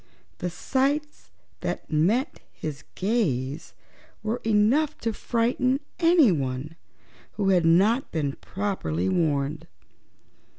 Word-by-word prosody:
The 180 - -2
sights 275 - -1 0.3
that - - -4
met 205 - +1
his 150 -3 -6
gaze 160 - -1 0.5
were 220 +2 -2
enough 225 +8 +2
to 225 -1 -1
frighten 245 +4 +1 0.2
anyone 165 - +3 0.6
who 200 -2 0
had 180 -3 +4
not 205 +10 +3
been 150 -4 -1
properly 185 - -2
warned. 145 - 0
195 Hz, 95 wpm, -26 LUFS, 155-245 Hz, 0.6 s, had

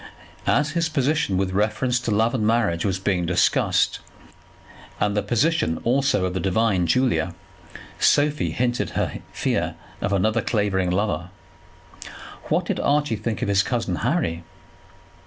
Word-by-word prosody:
As 150 +2 +2
his 165 0 0
position 150 - 0
with 95 0 0
reference 110 +5 0
to 120 - -4
love 110 +2 +2
and 120 -5 -1
marriage 105 -6 +1
was 95 -3 0
being 95 -3 -1
discussed, 85 0 +2 1.0
and 105 0 +1
the 105 - +2
position 120 - +1
also 130 -4 +2
of 90 - -2
the 95 - -2
divine 95 -1 +1
Julia, 90 -6 +1 0.6
Sophie 150 +1 +2
hinted 120 0 -1
her - - -1
fear - - -1 0.3
of 95 - -1
another 110 +4 +1
Clavering 100 -5 0
lover. 90 -1 -1 1.2
What - - 0
did - - -2
Archie 145 -4 +1
think 110 +1 -3
of - - -1
his 100 -1 +3
cousin 110 -5 -2
Harry? 115 - -1
105 Hz, 140 wpm, -23 LUFS, 95-125 Hz, 1.2 s, his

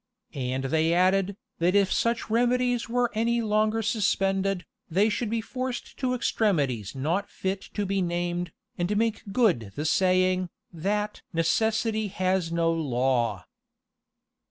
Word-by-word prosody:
And 130 0 -2
they 160 +5 +2
added, 190 +2 +2 0.2
"That 175 +3 +2
if 200 -2 +4
such 235 0 0
remedies 245 +1 +1
were 245 0 +1
any 230 +2 +1
longer 215 +1 +1
suspended, 195 -3 +1 0.2
they 195 +6 +3
should 220 +1 -1
be 225 0 0
forced 255 +2 -5
to 255 -2 0
extremities 140 - 0
not 165 +9 -1
fit 190 0 -3
to 205 - 0
be 195 0 0
named, 175 0 -2 0.3
and 185 +4 0
make 225 -1 +1
good 180 - +2
the 150 - -3
saying, 185 +1 +2 0.2
that 210 +5 -2
'Necessity 220 +6 +1
has 185 -3 0
no 170 0 +2
law. 125 - 0
195 Hz, 130 wpm, -27 LUFS, 165-220 Hz, 0.3 s, if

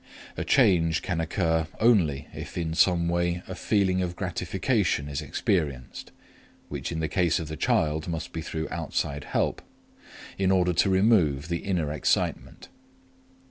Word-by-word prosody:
A - - -3
change 80 -3 +3
can 85 -2 -1
occur 80 0 0
only 95 - +3
if - - -8
in 80 -2 -2
some 85 0 +3
way 85 +1 0
a 95 - -5
feeling 95 -1 +1
of 90 -1 -3
gratification 90 - -1
is 70 +1 -3
experienced 75 -3 -2 0.6
which - - -4
in 80 -1 -3
the 80 - 0
case 85 +1 +1
of 80 - -5
the 80 - -4
child 75 +1 0
must 80 -2 -4
be 80 - -3
through 80 0 -4
outside 70 0 -3
help - - -1 0.8
in 95 -1 +2
order 90 -2 +3
to 95 - +2
remove 95 -8 +3
the 85 0 -1
inner 85 -7 -1
excitement. 75 - -1
85 Hz, 150 wpm, -26 LUFS, 80-95 Hz, 0.8 s, change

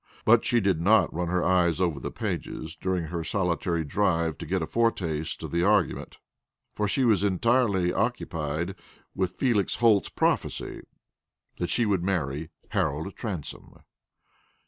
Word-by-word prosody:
But 115 +1 +6
she 120 - +2
did 95 -6 +1
not 105 +4 +4
run 85 +1 -2
her 90 +1 0
eyes 85 -2 +2
over 85 -6 0
the - - -4
pages 80 +1 -4
during 95 -2 -1
her 85 +1 -4
solitary 85 -2 -1
drive 85 -1 +1
to - - -6
get 90 0 0
a - - -1
foretaste 85 -8 -1
of - - -5
the 85 - +1
argument, 100 -1 +1 0.6
for 105 - -1
she 130 +5 +1
was 105 -5 +3
entirely 100 -2 +2
occupied 80 +4 -2 0.4
with 95 -1 -1
Felix 115 -7 +1
Holt's 110 -4 +3
prophecy - - -1 0.8
that 90 - -1
she 120 - +2
would 100 -4 +1
marry 80 -5 -2 0.2
Harold 80 +6 -1
Transome. 95 - -7
90 Hz, 145 wpm, -27 LUFS, 80-105 Hz, 0.8 s, But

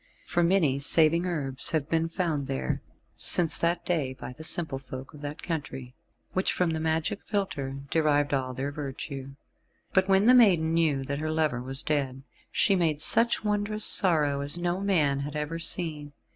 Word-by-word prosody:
For 175 - 0
many 170 -6 +2
saving 165 +4 +2
herbs 140 -6 -3
have 155 -3 -1
been 165 0 0
found 160 -6 -2
there 65 -1 -2 0.3
since 165 -4 +3
that 170 +1 0
day 145 -7 -1
by 125 - -8
the 155 - -11
simple 160 -4 -2
folk 130 0 -9
of 150 - -12
that 145 0 -7
country, 135 -6 -5 0.4
which 185 - +1
from 180 -2 0
the 160 - -2
magic 160 +4 -1
philtre 140 -10 -3
derived 145 -2 +2
all 130 -2 -1
their 140 +3 -3
virtue. 135 -1 -7 0.6
But 190 0 +2
when 195 +1 +4
the 250 - +7
maiden 180 -10 +5
knew 155 -5 +1
that 140 +1 -4
her 155 +1 -3
lover 155 -6 0
was 135 +2 0
dead, 135 -3 -2 0.3
she 195 - +3
made 160 -5 +1
such 230 +10 +3
wondrous 210 0 0
sorrow, 150 -6 +4
as 145 +4 +1
no 175 +1 -1
man 155 -9 +1
had 145 +1 -5
ever 150 +2 -3
seen. 155 -4 0
155 Hz, 175 wpm, -27 LUFS, 140-175 Hz, 0.6 s, the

